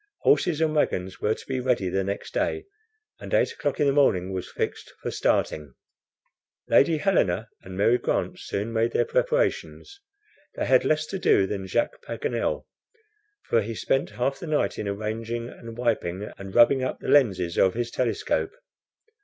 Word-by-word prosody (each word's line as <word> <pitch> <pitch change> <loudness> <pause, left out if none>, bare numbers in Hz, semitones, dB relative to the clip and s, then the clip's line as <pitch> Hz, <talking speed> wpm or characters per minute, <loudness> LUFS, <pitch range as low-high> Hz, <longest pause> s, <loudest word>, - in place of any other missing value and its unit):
Horses 175 - +3
and 155 -1 +2
wagons 95 -11 -1
were 110 +1 +1
to - - -13
be 130 -1 -2
ready 125 -6 +1
the 95 +2 0
next 100 +1 -5
day, 400 0 -1 0.5
and - - -9
eight - - +3
o'clock - - -3
in 145 - +3
the 140 - +3
morning 95 -10 +2
was 95 -1 -4
fixed - - -4
for - - -4
starting. 75 -5 0 0.9
Lady 160 +3 +4
Helena 115 - +1
and 95 0 -9
Mary 115 +5 +3
Grant - - -1
soon 105 +3 -4
made 115 +1 +1
their - - +2
preparations. 485 -4 -1 0.5
They - - -2
had - - +4
less 155 0 +2
to 195 +4 -5
do 100 - +4
than 95 -1 -4
Jacques 120 +6 -1
Paganel, 115 0 -2 0.8
for 115 - +2
he 110 +2 -5
spent 135 +5 0
half 135 +3 -2
the 175 - -7
night 155 -1 0
in 105 - -3
arranging, 110 +3 -3
and 115 -1 -10
wiping, 105 -5 -1
and 95 -1 -9
rubbing 130 +3 +6
up 130 - -2
the - - -8
lenses 95 -11 +3
of 95 - +4
his 120 0 -2
telescope. 290 - -1
115 Hz, 170 wpm, -25 LUFS, 100-145 Hz, 0.9 s, rubbing